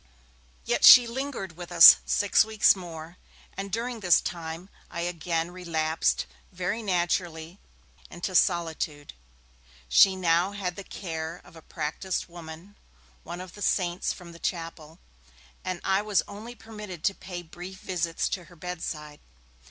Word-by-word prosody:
Yet - - 0
she 250 -1 +11
lingered 235 - -5
with 175 +1 -9
us 170 -1 +10
six 205 -1 +3
weeks 220 -1 +4
more, 170 -2 -9 0.4
and 195 0 -6
during 235 +2 -3
this 180 -4 +4
time 165 +1 -6 0.2
I 170 - -5
again 170 -1 -2
relapsed, 165 -3 -1 0.3
very 185 +5 -3
naturally, 175 -2 -2 0.5
into 175 +2 -5
solitude. 165 - 0 0.7
She 190 - +6
now 180 +1 +1
had 185 -3 -4
the 200 - -8
care 165 -3 -6
of - - -18
a 165 - -12
practised 160 +4 -4
woman, 170 +3 -11 0.4
one 175 - -7
of 185 -1 -10
the 205 - -12
'saints' 180 -2 0
from 175 -2 -10
the 170 - -13
Chapel, 165 -2 -5 0.7
and 185 -1 -3
I 190 +1 +2
was 210 -2 +1
only 220 +4 -9
permitted 210 -8 -10
to 200 - +2
pay 180 -2 -8
brief 180 +3 -10
visits 170 -2 -2
to 180 -3 -4
her 175 - -17
bedside. 155 -3 -6
175 Hz, 145 wpm, -27 LUFS, 165-195 Hz, 0.7 s, she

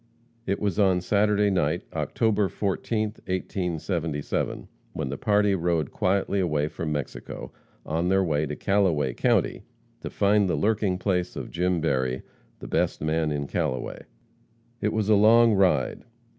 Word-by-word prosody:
It 100 - 0
was 100 -1 -1
on 95 -3 +4
Saturday 105 +1 +2
night, 85 -2 0
October 105 -3 +1
14, 105 +3 -1 0.2
1877, 85 -4 -2 0.3
when - - -3
the 70 - -4
party 105 -1 +3
rode 85 -4 0
quietly 100 +1 0
away 75 -5 0
from 80 -1 -4
Mexico, 75 -3 -5 0.3
on 85 +3 -1
their 95 0 +3
way 75 -3 0
to 75 - -4
Callaway 85 -11 +1
county, - - +1 0.4
to - - -6
find 100 -1 +2
the - - +1
lurking 105 -3 +1
place 90 -2 -1
of - - -6
Jim 90 0 0
Berry, 65 -5 0 0.3
"the - - -9
best - - 0
man 80 0 0
in 70 -1 -2
Callaway." 65 -2 -2 0.8
It 105 - +1
was 110 -2 -1
a 110 - +5
long 110 +2 +6
ride. 95 -2 +2
90 Hz, 145 wpm, -26 LUFS, 80-100 Hz, 0.8 s, long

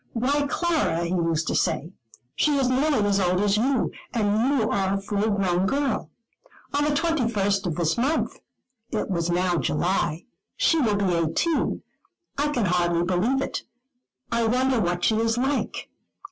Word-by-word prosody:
"Why, 280 +5 +1
Clara," 315 - 0
he 170 - -3
used 165 -3 0
to - - -1
say, 165 +5 0 0.4
"she 295 -2 +2
is 270 -2 +2
nearly 260 -4 +2
as 200 0 +2
old 180 -1 +1
as 205 -1 +2
you, 255 +3 +1 0.2
and 215 +2 +2
you 215 - +1
are 195 -1 +1
a - - -1
full 205 +2 -1
grown 190 -2 +1
girl. 280 +3 -1 0.6
On 290 +1 +1
the - - +1
21st 230 - 0
of 165 - -2
this 170 +5 0
month" 280 +6 0 0.5
it 215 - -2
was 170 -2 -1
now 175 0 +1
July 170 +1 -1 0.3
"she 330 - +3
will 220 -7 +2
be 195 -3 +1
eighteen; 170 - 0 0.5
I 290 +1 0
can 250 -7 0
hardly 175 -1 +1
believe 205 +10 +1
it. - - -4 0.7
I 235 -1 +1
wonder 255 +1 +2
what 175 -3 -1
she 220 - +3
is 225 +1 +1
like. 270 +3 -2
210 Hz, 165 wpm, -24 LUFS, 180-265 Hz, 0.7 s, she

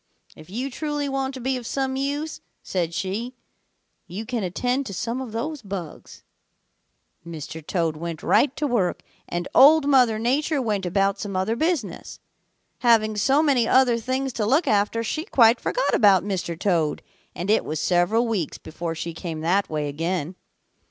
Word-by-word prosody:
'If 155 +2 -14
you 250 +7 -4
truly 295 +1 -3
want 270 0 -2
to - - -6
be 260 +1 -1
of 240 -2 -7
some 265 -1 -1
use,' 285 +3 -3 0.2
said 175 -3 -2
she, 205 +8 -3 0.7
'you 205 +6 -6
can 240 -1 -2
attend 250 +9 -1
to 195 - -6
some 235 +6 -3
of 255 -4 -6
those 285 +6 -4
bugs.' 190 -6 -8 1.0
"Mr. 160 -1 -8
Toad 165 -1 -1
went 165 0 -6
right 280 -1 +3
to 300 - -2
work, 235 -10 0 0.3
and 175 +1 -3
Old 295 +3 +7
Mother 250 -6 +4
Nature 280 +7 0
went 210 -7 -1
about 195 +2 +1
some 200 -2 -5
other 190 +5 0
business. 270 - -2 0.6
Having 220 -3 +3
so 270 +8 +3
many 260 -7 +3
other 250 -3 +4
things 260 +2 -2
to 215 - -1
look 285 +8 +3
after, 210 +2 +1
she 310 +8 -2
quite 235 - +4
forgot - - 0
about 195 -5 +5
Mr. 185 -4 -3
Toad, 165 -6 0 0.3
and 185 +4 -1
it 220 - +3
was 155 0 -4
several 185 +8 +2
weeks 200 -9 -2
before 165 +1 -6
she 165 +1 -5
came 165 -2 -6
that 185 +5 +1
way 150 -1 -2
again. 165 +3 -2
220 Hz, 170 wpm, -24 LUFS, 175-265 Hz, 1.0 s, Old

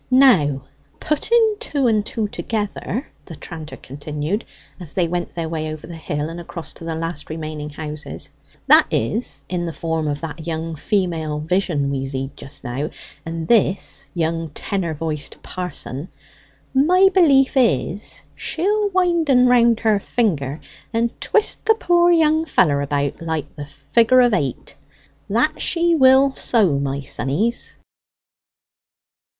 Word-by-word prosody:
"Now 195 - +5 0.4
putting 440 +8 +2
two 280 -3 -1
and 215 -3 +3
two 215 0 -2
together," 215 +4 -3 0.2
the 165 - -9
tranter 160 0 -9
continued, 150 - -4 0.4
as 170 -5 -10
they 180 -3 +2
went 175 +1 -3
their 165 -2 -2
way 155 -1 -3
over 155 -1 -8
the 175 - -9
hill, 150 -2 -3
and 165 +1 -7
across 170 -2 -8
to - - -12
the 165 -1 -3
last 165 -2 -5
remaining 155 -1 -5
houses; 150 0 -7 0.3
"that - - +7
is, 140 - -1
in 175 -1 -2
the - - -3
form 160 -1 -2
of 145 -1 -2
that 165 0 -7
young 165 0 -3
female 165 -3 -1
vision 155 -4 0
we 135 -1 -2
zeed 135 +1 -4
just 140 0 -11
now, 135 +5 -3 0.4
and 165 -1 -4
this 205 -4 +1
young 165 -1 -1
tenor 175 -5 -2
voiced 155 -1 -4
parson, 180 -4 -6 0.6
my 360 +8 +5
belief 280 -8 +5
is 210 - 0
she'll 410 +5 0
wind 350 -4 +1
en 250 -2 +6
round 235 -2 +4
her 215 -3 +3
finger, 160 - -1 0.3
and 230 0 +1
twist 430 -1 +1
the 445 - +6
pore 350 -5 +3
young 315 -1 +4
feller 145 - +2
about 140 +1 -1
like 160 -3 -3
the 145 -1 -8
figure 185 - +3
of 245 -2 +4
8 140 -10 -2 0.5
that - - +1
she 340 0 +2
will 265 -2 +5
so, 195 - +2
my 140 0 -2
sonnies." 145 - -2
170 Hz, 145 wpm, -21 LUFS, 150-245 Hz, 0.6 s, that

